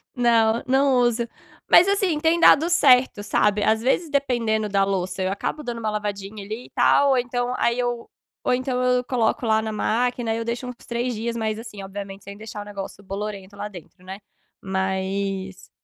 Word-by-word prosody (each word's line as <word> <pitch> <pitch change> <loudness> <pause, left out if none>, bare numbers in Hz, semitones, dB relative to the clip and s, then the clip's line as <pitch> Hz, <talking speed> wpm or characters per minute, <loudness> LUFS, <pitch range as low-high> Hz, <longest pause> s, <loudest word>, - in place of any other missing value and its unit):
Não, 230 -2 +3
não 270 +1 +3
uso. 240 -1 +1 0.4
Mas 360 - +7
assim, 390 -6 +1
tem 325 +2 +2
dado 330 0 +6
certo, 260 -9 +4
sabe. 210 0 +1
Às 220 +1 +2
vezes, 305 +6 +1
dependendo 235 -7 0
da 195 -1 +2
louça, 190 -1 -2
eu 185 - 0
acabo 200 +9 -3
dando 240 -3 -4
uma 220 -1 -2
lavadinha 205 -1 -4
ali 220 +4 -6
e - - -16
tal 280 - +3
ou 265 - +3
então 245 0 -1
aí 235 0 +1
eu 240 -1 -2 0.3
ou 255 - +2
então 255 0 -1
eu 250 0 +2
coloco 245 -1 0
lá 220 -1 +3
na 220 0 -3
máquina, 240 +2 -1
aí 225 - -1
eu 230 - -4
deixo 240 +2 -3
uns 250 - -6
3 240 +1 -2
dias. 230 +2 -3
Mas 220 -1 -2
assim, 220 -4 -9
obviamente 195 0 -8
sem 200 0 -10
deixar 215 0 -8
o - - -9
negócio 200 -1 -8
bolorento 200 0 -6
lá 205 - -4
dentro, 180 -2 -13
né. 190 +1 -8 0.4
Mas 190 0 -3
220 Hz, 195 wpm, -23 LUFS, 200-250 Hz, 0.4 s, Mas